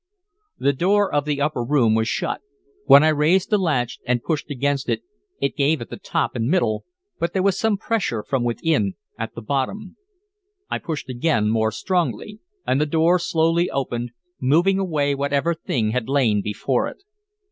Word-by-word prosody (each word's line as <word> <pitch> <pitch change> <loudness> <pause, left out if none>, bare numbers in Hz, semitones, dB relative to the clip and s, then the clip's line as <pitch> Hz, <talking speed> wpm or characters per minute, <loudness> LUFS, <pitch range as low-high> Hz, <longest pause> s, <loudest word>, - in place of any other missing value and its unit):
The 140 - +2
door 195 +6 +2
of 145 -1 +1
the 145 -1 -1
upper 145 -4 0
room 120 -4 +3
was 110 0 +1
shut. - - -2 0.5
When 140 - +9
I 155 - +5
raised 155 +6 +2
the 210 - +4
latch 140 -10 0
and 120 -1 +1
pushed 155 -2 -2
against 140 0 -1
it, - - -1 0.4
it 140 - -1
gave 150 +1 +2
at 120 - -8
the - - -6
top - - -2
and 115 -1 -1
middle, 120 - +1 0.3
but 170 0 -1
there 190 - +1
was 195 -2 +3
some 220 -2 +1
pressure 190 - -1
from 130 +1 -1
within 120 -4 0 0.2
at 115 0 -5
the 115 - -7
bottom. 145 - -3 0.7
I - - -1
pushed 155 -4 -5
again, 120 -4 +1
more 110 0 +1
strongly, 185 - -2 0.3
and 135 - +1
the 150 - +1
door 165 +4 +3
slowly 165 +1 +1
opened, 120 -3 -3 0.3
moving 170 +9 +3
away 150 -7 0
whatever 140 +4 0
thing 115 -9 -1
had 125 0 -2
lain 120 -7 +2
before 105 +5 -1
it. - - -10
145 Hz, 180 wpm, -22 LUFS, 120-170 Hz, 0.7 s, When